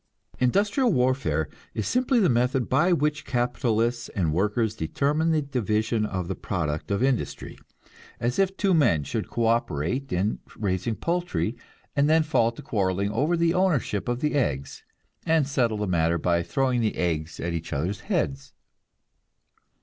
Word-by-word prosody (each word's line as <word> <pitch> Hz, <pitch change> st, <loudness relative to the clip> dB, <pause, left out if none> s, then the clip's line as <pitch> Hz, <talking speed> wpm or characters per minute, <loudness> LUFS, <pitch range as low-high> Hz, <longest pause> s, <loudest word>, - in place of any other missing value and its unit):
Industrial 205 Hz, -, +2 dB
warfare 125 Hz, -, +1 dB, 0.3 s
is 110 Hz, -, -2 dB
simply 255 Hz, 0 st, +2 dB
the 195 Hz, -, +4 dB
method 125 Hz, +1 st, +1 dB
by 175 Hz, +3 st, +3 dB
which 150 Hz, -2 st, +1 dB
capitalists 120 Hz, -1 st, 0 dB
and 85 Hz, -6 st, -1 dB
workers 105 Hz, +5 st, 0 dB
determine 145 Hz, -, 0 dB
the 155 Hz, -2 st, +2 dB
division 110 Hz, -4 st, 0 dB
of 90 Hz, -3 st, -3 dB
the 95 Hz, -, -2 dB
product 80 Hz, -7 st, -3 dB
of 100 Hz, +4 st, 0 dB
industry; 130 Hz, -3 st, -1 dB, 0.6 s
as 120 Hz, +6 st, -1 dB
if 195 Hz, 0 st, +1 dB
two 195 Hz, -2 st, +2 dB
men 115 Hz, -, +3 dB
should -, -, -4 dB
co 115 Hz, -, -1 dB
operate 115 Hz, -, 0 dB
in 100 Hz, +5 st, 0 dB, 0.2 s
raising 100 Hz, +1 st, -1 dB
poultry, 175 Hz, -8 st, -1 dB, 0.4 s
and 145 Hz, +1 st, +3 dB
then 160 Hz, 0 st, +5 dB
fall 115 Hz, -7 st, +2 dB
to 115 Hz, -, -11 dB
quarrelling 100 Hz, -1 st, 0 dB
over 155 Hz, +10 st, +1 dB
the 170 Hz, 0 st, +2 dB
ownership 175 Hz, -, +1 dB
of 120 Hz, 0 st, -1 dB
the 150 Hz, -, 0 dB
eggs, 70 Hz, -, -1 dB, 0.4 s
and 160 Hz, -4 st, +3 dB
settle 120 Hz, -6 st, +1 dB
the 105 Hz, -, -1 dB
matter 85 Hz, -2 st, +1 dB
by 85 Hz, +1 st, +1 dB
throwing 125 Hz, +8 st, 0 dB
the 110 Hz, -2 st, 0 dB
eggs 80 Hz, -3 st, -2 dB
at 85 Hz, 0 st, -2 dB
each 85 Hz, -1 st, -4 dB
other's 85 Hz, +8 st, -2 dB
heads. 140 Hz, -, -2 dB
120 Hz, 155 wpm, -26 LUFS, 95-150 Hz, 0.6 s, then